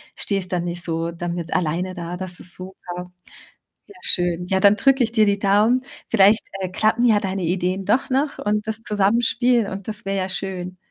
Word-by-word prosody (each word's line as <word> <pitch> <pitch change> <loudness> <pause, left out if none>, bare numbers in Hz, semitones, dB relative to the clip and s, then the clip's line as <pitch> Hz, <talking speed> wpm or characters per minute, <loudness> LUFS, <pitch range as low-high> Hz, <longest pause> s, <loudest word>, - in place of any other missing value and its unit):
stehst 195 -3 -1
dann 175 -1 0
nicht 175 0 -3
so 165 0 -2
damit 170 0 -4
alleine 180 +3 -1
da. 175 -1 -5
Das 180 -1 -1
ist 180 - -6
super! 180 -1 -8 0.8
Ja, 405 - -15
schön. 175 -1 +1
Ja, 190 -1 +1
dann 200 +1 +6
drücke 270 +4 +3
ich 225 - +1
dir 220 -2 +4
die 200 0 +1
Daumen. 210 +6 +3 0.3
Vielleicht, 210 0 +4
äh, 185 - -2
klappen 220 +5 +1
ja 220 -3 +5
deine 195 -2 -3
Ideen 185 +2 -1
doch 225 +7 +1
noch 275 +2 0
und 210 0 -1
das 220 +1 -2
Zusammenspiel 230 +3 +2
und 195 +1 -7
das 210 -2 -4
wär 195 - -2
ja 190 -1 -1
schön. 185 -1 -5
195 Hz, 195 wpm, -22 LUFS, 180-215 Hz, 0.8 s, dann